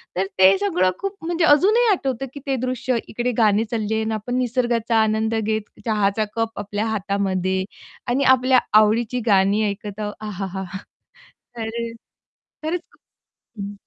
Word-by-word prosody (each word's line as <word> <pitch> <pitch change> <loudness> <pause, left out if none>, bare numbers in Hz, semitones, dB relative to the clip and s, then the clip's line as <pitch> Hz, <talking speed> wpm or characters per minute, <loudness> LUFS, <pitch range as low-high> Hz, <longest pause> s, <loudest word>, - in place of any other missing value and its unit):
तर 190 - +1
ते 190 +1 +7
सगळं 185 -2 +2
खूप 395 0 -3
म्हणजे 335 0 +1
अजूनही 415 +11 +5
आठवतं, 270 - -1
की 285 - -7
ते 270 - +1
दृश्य 255 0 -1
इकडे 245 +2 -2
गाणी 215 -1 +4
चालले 220 -2 -1
आहे. 220 - 0
आणि 220 0 -2
आपण 220 +4 -3
निसर्गाचा 240 -2 0
आनंद 220 +1 0
घेत, 220 0 -1 0.2
चहाचा 210 -1 +1
कप 225 0 -2
आपल्या 205 +2 -3
हातामध्ये 190 -3 -1 0.4
आणि 260 +3 +1
आपल्या 255 0 +3 0.2
आवडीची 230 +3 +2
गाणी 200 +1 +3
ऐकत 205 +1 -7
आहो. 210 -1 -2 0.2
आहाहा! 190 -1 -4 0.9
तर 220 -1 -3
अ, 230 0 -4 0.7
खरचं 350 +1 -3
खूप - - -27 0.6
हं. 200 +1 -6
220 Hz, 150 wpm, -22 LUFS, 205-250 Hz, 0.9 s, ते